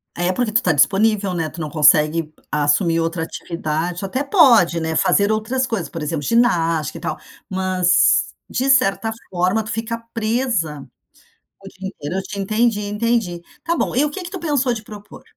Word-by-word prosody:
É, 175 +1 0
porque 235 +1 -1
tu 235 +4 +2
tá 175 - +3
disponível, 195 +4 +2
né. 165 -3 -2
Tu 165 - -11
não 155 - -4
consegue 155 +1 +3 0.2
assumir 150 +3 +2
outra 165 0 -1
atividade 170 +1 -4
tu 195 - -4
até 260 +8 -2
pode, 235 - +5
né, 160 0 -2
fazer 200 +6 +3
outras 240 +5 -1
coisas, 215 -8 -3
por 165 - -7
exemplo, 150 -1 -3
ginástica 165 - +1
e - - -11
tal. - - -3 0.3
Mas, 185 -1 +2 0.2
de 265 +2 -1
certa 225 -4 +3 0.2
forma, 185 +4 0
tu 215 - -9
fica 225 +1 -3 0.2
presa 220 - -1 0.8
o 195 - -10
dia 190 0 -8
inteiro. 150 0 -7
Eu 190 - -2
te 200 -1 -7
entendi, 215 +2 +1
entendi. 210 -3 -1 0.2
Tá 335 - 0
bom, - - -1
e 270 - +3
o - - -1
que 365 - -6
que 350 - -7
tu 375 - -6
pensou 280 -6 0
de 220 -2 -6
propor? 205 -1 -12
195 Hz, 185 wpm, -20 LUFS, 165-230 Hz, 0.8 s, pode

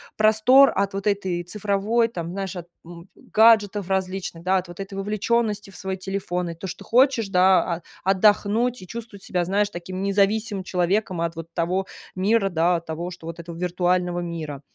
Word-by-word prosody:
простор 220 +6 +6
от 195 0 0
вот 195 +1 -3
этой 190 -4 -1
цифровой, 210 +4 0
там, 170 -6 -6
знаешь, 195 -1 -4
от, 175 -1 -7 0.2
м, 170 +2 -12
гаджетов 210 -3 +3
различных, 190 -3 -2
да, 190 +1 +2
от 180 -1 -4
вот 175 - -11
этой 195 0 -6
вовлеченности 210 +1 -1
в - - -16
свой 190 0 -4
телефон, 180 -2 -3
и 165 - -6
то, 190 +3 -7
что - - -8
хочешь, 245 -3 +3
да, 185 0 +5 0.2
а, 170 - -10 0.2
отдохнуть 210 +4 +2
и 185 - -11
чувствовать 225 -3 -8
себя, 180 -2 -1
знаешь, 200 +3 +1
таким 185 +1 -6
независимым 200 0 +1
человеком 185 +1 0
от 170 0 -2
вот 165 0 -9
того 180 +3 -1 0.3
мира, 200 +2 +2
да, 170 0 +2
того, 165 +2 -5
что 170 -2 -10
вот 165 0 -7
этого 170 0 -8
виртуального 180 0 0
мира. 155 -5 -5
190 Hz, 180 wpm, -23 LUFS, 175-205 Hz, 0.3 s, простор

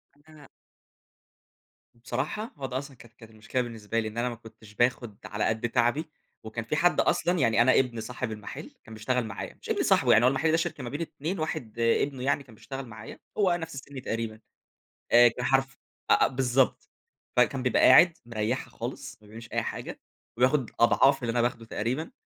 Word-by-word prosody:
إن 145 - -27
أنا 155 -1 -15 1.5
بصراحة، 140 - -4
هو 135 - -5
ده 130 0 -3
أصلًا 140 -1 -7
كانت 115 -1 -16
كانت 115 -1 -15
المشكلة 110 +4 -3
بالنسبة 115 -2 -3
لي، 110 - -2
إن 110 +1 -8
أنا 120 +1 0
ما 120 - -6
كنتش 110 -2 -15
باخد 120 -2 0
على 105 0 -3
قدّ 110 +2 0
تعبي، 120 +7 +1 0.3
وكان 110 +1 -5
في 115 - -2
حد 175 +3 +3
أصلًا 175 +1 +1
يعني 115 -5 +3
أنا 130 +2 +5
ابن 120 -3 -1
صاحب 120 +1 -5
المحل 105 -1 -8
كان 110 - -12
بيشتغل 120 +3 -1
معايا، 110 - -7
مش - - -10
ابن - - +1
صاحبه - - +4
يعني، 110 - +6
هو - - +7
المحل 135 +5 +2
ده 160 - +3
شركة 165 -5 -3
ما 120 - -5
بين 145 +5 -5
2، 165 +3 -4
واحد 120 -7 -4
ابنه 125 +3 +1
يعني 140 +1 +1
كان 125 -5 -17
بيشتغل 135 +4 -7
معايا، 110 -1 -10 0.2
هو 190 -4 +3
نَفْس 165 -3 -6
السن 135 0 -8
تقريبًا، 115 -2 -4 0.7
آآ، 120 0 +8
كان 120 +2 -2
حرف 135 0 +1 0.3
أ - - +9
أ - - +3
بالضبط، 130 0 +1 0.5
فكان 125 +1 +2
بيبقى 125 - +2
قاعد 170 +6 +7
مريحها 115 +2 -2
خالص، 130 +2 -7
ما 105 - -18
بيعملش 115 +1 -11
أي - - +1
حاجة، - - -6 0.4
وياخد 130 0 +2
أضعاف 125 +4 +4
اللي 120 -2 -1
أنا 120 0 +1
باخده 115 -1 -1
تقريبًا، 125 +9 -3
125 Hz, 195 wpm, -27 LUFS, 115-135 Hz, 1.5 s, أ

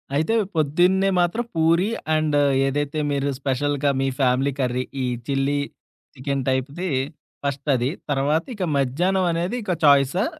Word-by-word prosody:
అయితే 160 +9 +1 0.2
పొద్దున్నే 180 +6 +3
మాత్రం 220 +8 0
పూరి 165 +5 +3 0.3
అండ్ 155 -1 +1 0.3
ఏదైతే 145 +2 -2
మీరు 140 0 0
స్పెషల్‌గా 145 +1 0
మీ 135 - +1
ఫ్యామిలీ 130 +1 +2
కర్రీ 125 0 0 0.2
ఈ - - 0 0.2
చిల్లి 140 +1 +1 0.6
చికెన్ 135 0 -2
టైప్‌ది 140 +8 -2 0.6
ఫస్టది. 135 -2 0 0.2
తర్వాత 145 +4 +1
ఇక 190 - -3
మధ్యాహ్నం 175 +9 +1
అనేది 175 +7 -2
ఇక 185 - -2
చాయిసా? 140 - +4
145 Hz, 125 wpm, -23 LUFS, 135-170 Hz, 0.6 s, చాయిసా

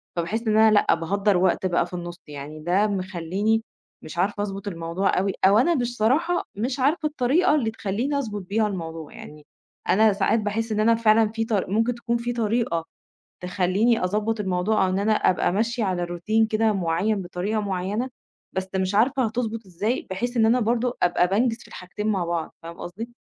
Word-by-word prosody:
فباحِس 175 +6 -2
إن 215 0 +3
أنا 220 0 +6
لأ 205 - +4
باهدَّر 195 +4 +1
وقت 185 +1 +1
بقي 175 -2 +2
في 175 - -15
النُص، 175 0 -6
يعني 150 +1 -8
ده 180 +7 +2
مخلّيني 190 +3 -1 0.4
مش 155 - -10
عارفة 205 +3 0
أضبُط 200 0 -5
الموضوع 170 +1 -1
أوي 195 +1 0
أو 200 +2 +6
أنا 330 +9 +3
مش 245 -3 -2
صراحة 300 +11 +2
مش 245 +6 -2
عارفة 305 +4 +2
الطريقة 295 +3 +2
اللي 235 -7 0
تخلّيني 220 +7 -2
أضبُط 215 -7 -3
بيها 210 +4 0
الموضوع. 165 -5 -6
يعني 150 0 -12 0.4
أنا 215 +1 +5
ساعات 200 +3 +1
باحِس 220 +2 -2
إن 210 - 0
أنا 230 +2 +4
فعلًا 225 -1 +4
في 225 0 -2
ط 225 - -3
ممكن 220 +4 +1
تكون 235 0 -1
في 240 +1 -3
طريقة 225 -7 0 0.6
تخلّيني 190 +5 +1
أضبّط 210 +4 -1
الموضوع 190 +2 +1
أو - - -1
إن 185 - 0
أنا 210 +2 +2
أبقي 185 -4 +2
ماشية 230 +4 0
على 180 -3 -1
روتين 195 +6 +1
كده 220 0 +1
معيّن 190 +3 0
بطريقة 185 +5 -2
معيّنة، 200 +5 -2 0.4
بس 190 0 -3
مش 190 +1 -1
عارفة 255 +5 +3
هتضبُط 225 -1 -3
إزاي 205 +7 -2
بحيث 240 +7 -3
إن 225 -1 +4
أنا 240 +3 +3
برضه 240 +2 0
أبقي 175 0 +3
بانجِز 225 +5 +1
في - - -15
الحاجتين 195 +4 -7
مع 195 -5 +1
بعض 170 -1 -3
فاهم 170 0 -9
قصدي؟ 215 +7 -7
210 Hz, 190 wpm, -24 LUFS, 185-225 Hz, 0.6 s, أنا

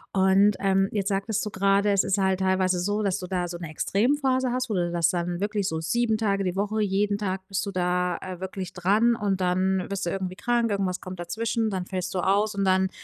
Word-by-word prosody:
Und, 195 +2 +4
ähm, 195 0 +2
jetzt 200 -1 -1
sagtest 200 +2 -1
du - - -3
grade, 200 +1 +2
es 200 - +3
ist 195 - 0
halt 190 -1 +1
teilweise 185 -1 +1
so, 205 +4 -1
dass 195 0 0
du 180 - -6
da 180 -1 -1
so 175 0 -6
'ne 170 -2 -7
extrem 215 - +1
Phase 260 -2 +1
hast, 255 -1 -2
wo - - -1
du 175 -2 0
das 170 -1 +2
dann 175 0 -2
wirklich 205 -1 -1
so 160 -3 -2
7 220 +7 +1
Tage 200 -3 0
die 180 0 -2
Woche 210 +2 -1
jeden 205 0 +1
Tag 190 -2 -3
bist 195 +1 -2
du 200 - -4
da, 180 0 0
äh, 185 -1 -7
wirklich 190 -1 -6
dran 210 +6 +3
und 195 -3 -1
dann 185 +1 +1
wirst 195 -2 -3
du - - -1
irgendwie 185 -1 -3
krank, 235 +1 0
irgendwas 190 -2 -1
kommt 185 -1 -8
dazwischen, 225 +5 -1
dann 185 -2 -3
fällst 185 -1 -4
du 185 - -1
aus 205 +3 +1
und 200 - 0
dann, 190 0 +3
195 Hz, 240 wpm, -26 LUFS, 185-205 Hz, -, Und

